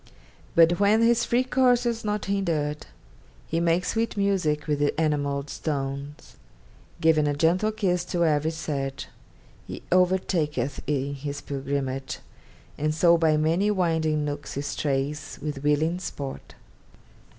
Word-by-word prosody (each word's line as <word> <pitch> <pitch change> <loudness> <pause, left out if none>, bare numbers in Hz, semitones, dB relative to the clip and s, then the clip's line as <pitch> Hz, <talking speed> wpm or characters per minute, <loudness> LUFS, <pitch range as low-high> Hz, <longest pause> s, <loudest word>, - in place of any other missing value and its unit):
But 170 +2 +5
when 210 +3 +4
his 235 0 +3
free 245 +2 +2
course 250 -1 +3
is 230 -1 -1
not 210 -1 -2
hindered, 165 -7 -1 0.6
He 165 - -1
makes 170 +1 +1
sweet 225 -1 -1
music 180 -7 +1
with 150 -2 0
the 145 +2 0
enamelled 145 -2 0
stones, 140 -1 -5 0.6
Giving 155 -2 +3
a 145 - 0
gentle 175 +8 +2
kiss 185 -5 0
to 175 -1 0
every 155 0 +2
sedge 140 -4 -4 0.6
He - - -7
overtaketh 175 -6 +1
in 140 -1 -1
his 140 +1 -5
pilgrimage: 135 -1 -3 0.6
And 155 +1 0
so 170 +1 +5
by 160 -2 +3
many 165 +7 +2
winding 160 -6 +1
nooks 145 0 -5
he 140 - -2
strays 145 +1 -2
With 150 -2 -4
willing 155 +4 +1
sport. 140 -7 -7
155 Hz, 135 wpm, -26 LUFS, 145-185 Hz, 0.6 s, But